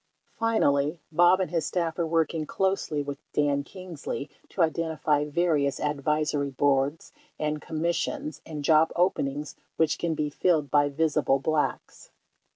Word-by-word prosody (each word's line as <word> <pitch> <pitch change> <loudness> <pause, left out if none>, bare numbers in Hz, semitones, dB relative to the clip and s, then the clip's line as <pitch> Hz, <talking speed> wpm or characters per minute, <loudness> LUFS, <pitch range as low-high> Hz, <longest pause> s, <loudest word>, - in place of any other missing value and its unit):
50 - - -35
Finally, 160 -9 +2
Bob 175 +3 +5
and 185 -4 -1
his 165 -3 0
staff 170 -2 -2
are 170 - +1
working 160 -1 0
closely 190 -6 0
with 140 -1 -6
Dan 145 -1 +1
Kingsley 165 -4 -7 0.2
to 180 - +1
identify 160 -2 0
various 150 -3 +1
advisory 150 0 0
boards 140 +2 0 0.3
and 150 0 -2
commis 165 +2 -1
sions 300 0 -4
and 150 -2 -6
job 160 +1 +5
openings 150 -5 0 0.2
which 160 -2 +2
can 170 -2 -1
be 150 -1 -2
filled 155 -4 +1
by 145 -1 +4
visible 150 -2 +1
Blacks. 150 +2 -2
155 Hz, 145 wpm, -27 LUFS, 145-170 Hz, 0.3 s, Bob